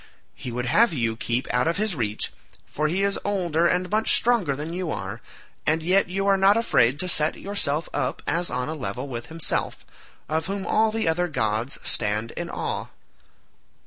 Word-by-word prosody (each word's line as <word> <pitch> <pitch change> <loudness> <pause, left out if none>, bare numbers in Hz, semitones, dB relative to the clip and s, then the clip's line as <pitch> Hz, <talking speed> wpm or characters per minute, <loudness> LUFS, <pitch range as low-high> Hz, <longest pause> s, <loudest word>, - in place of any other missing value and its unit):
He 125 - -7
would 125 +1 -3
have 215 - +4
you 115 -5 0
keep 120 +2 -2
out 125 +4 +2
of 170 - +1
his 215 -1 0
reach, 110 -7 -2 0.3
for 155 +1 -1
he 185 +5 0
is 200 0 +1
older 175 -5 +1
and 180 +1 +1
much 215 +1 +3
stronger 225 - +2
than 155 +4 -5
you 180 -1 -3
are, 95 -1 -4 0.5
and 160 +1 +2
yet 185 +2 +3
you 195 +2 -1
are 195 -1 +4
not 195 +2 +5
afraid 145 - +3
to 185 - -2
set 155 -3 +2
yourself 165 -6 -1
up 130 +1 -2
as 170 +3 0
on 125 0 -2
a 155 - -2
level 135 -2 -4
with 120 -3 -6
himself, 165 0 0 0.4
of 160 +2 -1
whom 195 0 -3
all 220 +1 +3
the 225 -3 -1
other 175 +2 +2
gods 110 -3 -1
stand 105 +1 0
in - - -5
awe." - - -3
160 Hz, 190 wpm, -25 LUFS, 125-195 Hz, 0.5 s, not